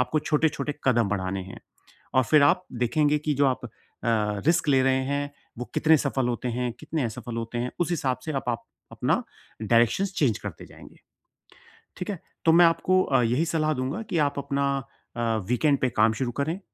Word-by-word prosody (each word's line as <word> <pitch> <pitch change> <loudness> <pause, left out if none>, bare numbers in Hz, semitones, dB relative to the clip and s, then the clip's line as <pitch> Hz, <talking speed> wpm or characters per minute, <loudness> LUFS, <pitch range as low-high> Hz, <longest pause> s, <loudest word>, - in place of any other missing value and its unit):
आपको 155 +5 +1
छोटे-छोटे 150 -2 0
कदम 120 -5 +3
बढ़ाने 95 -1 -2
हैं। 95 - -11 0.5
और 130 - +5
फ़िर 150 +3 +5
आप 165 +6 +3
देखेंगे 150 +5 +2
कि 150 0 -1
जो 140 +1 +3
आप 130 -1 -1 0.4
अ, 115 - +2 0.4
रिस्क 170 -2 +2
ले 135 -2 +4
रहे 130 0 +2
हैं, 145 0 -2 0.3
वो 125 - -3
कितने 160 0 +5
सफल 135 -3 -1
होते 125 +1 -2
हैं, 120 0 -2
कितने 155 0 -3
असफल 115 +1 -5
होते 115 +1 -4
हैं। 125 +1 -2
उस 175 - +1
हिसाब 135 -7 -1
से 155 - -3
अब 135 - -2
आप 115 - -2 0.3
अपना - - 0 0.4
डायरेक्शन्स 120 - +2
चेंज 130 - +1
करते - - -8
जाएँगे, - - -15 1.0
ठीक 180 +2 -5
है? 190 -5 -3 0.3
तो 160 - +6
मैं 170 +1 +7
आपको 185 +3 +3
अ, 135 -2 +2
यही 125 +8 +1
सलाह 155 -2 0
दूँगा 135 - -3
कि 170 - -1
आप 140 - -4
अपना 140 0 -1 0.5
अ, - - -1 0.3
वीकेंड 140 +3 +2
पे 130 - +2
काम 110 -1 +3
शुरू 120 -2 0
करें, 165 +6 -2
140 Hz, 195 wpm, -26 LUFS, 120-155 Hz, 1.0 s, मैं